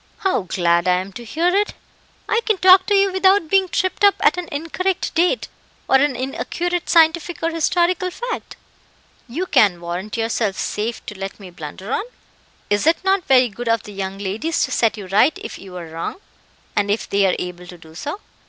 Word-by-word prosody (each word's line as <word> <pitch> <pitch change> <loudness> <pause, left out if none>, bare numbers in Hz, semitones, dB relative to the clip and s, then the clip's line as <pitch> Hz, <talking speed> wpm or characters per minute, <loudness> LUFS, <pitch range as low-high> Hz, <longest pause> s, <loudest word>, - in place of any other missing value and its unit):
"How 380 - +1
glad 175 -1 +1
I 180 - +4
am 190 +2 -4
to 240 - -8
hear 325 +10 0
it! 415 +1 +1 0.5
I 455 - +1
can 435 -3 +2
talk 370 0 +6
to 410 - +3
you 395 0 +3
without 380 -3 +3
being 385 -1 +3
tripped 370 +3 -1
up 405 -1 +6
at - - +4
an 360 -1 -5
incorrect 350 +5 -2
date, 355 +8 +1 0.4
or 265 - +5
an 275 -1 +1
inaccurate 340 +7 -3
scientific 330 +1 +3
or 330 - +1
historical 350 +2 +1
fact. 485 +7 -6 0.7
You 310 +10 -3
can 200 - +3
warrant 175 +6 -5
yourself 225 -3 0
safe 225 +3 -3
to 210 -3 -8
let 195 +2 -6
me 190 -3 -11
blunder 175 - -8
on?" - - +1 0.7
"Is 205 +8 +2
it 330 - +5
not 385 -1 +1
very 255 -2 +5
good 235 +3 -5
of 230 -1 +1
the 210 - -10
young 195 0 -4
ladies 210 +12 -1
to 260 - -9
set 225 -3 +1
you 205 - -7
right 215 - +3
if 435 - -8
you 185 -2 -10
are 175 - -6
wrong, 165 +1 -5 0.6
and 205 -1 +1
if 210 +2 -1
they 200 -1 +2
are 185 - +1
able 180 0 -6
to 175 - -11
do 160 -1 -16
so?" 290 - -5
255 Hz, 200 wpm, -20 LUFS, -, 0.7 s, talk